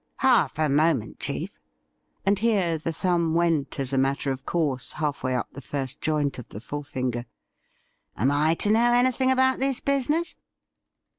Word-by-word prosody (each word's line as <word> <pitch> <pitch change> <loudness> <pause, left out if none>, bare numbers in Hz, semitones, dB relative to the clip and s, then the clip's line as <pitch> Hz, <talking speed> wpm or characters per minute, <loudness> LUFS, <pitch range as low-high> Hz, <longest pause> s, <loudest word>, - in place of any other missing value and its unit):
'Half 250 - +3
a 155 -1 +2
moment, 145 -5 +1
chief - - -3 0.3
— - - -45
and 200 0 +2
here 195 -8 +1
the 165 - -3
thumb 170 -1 0
went, 165 -5 0
as 135 0 -1
a 135 - +2
matter 135 +1 0
of 135 0 -6
course, 145 -7 -1
halfway 145 -4 -2
up 125 - -2
the 140 - -9
first 135 +1 -4
joint 150 -3 0
of 120 - -10
the 105 - -8
fore 145 +6 -6
fino 125 -3 -2
er; 120 - -8 0.5
' - - -42
am 130 +6 +2
I 150 +3 +2
to 205 - +1
know 235 +2 +4
anything 255 +1 +2
about 260 0 +3
this 270 -1 +1
business 280 +5 0
155 Hz, 180 wpm, -25 LUFS, 135-220 Hz, 0.5 s, know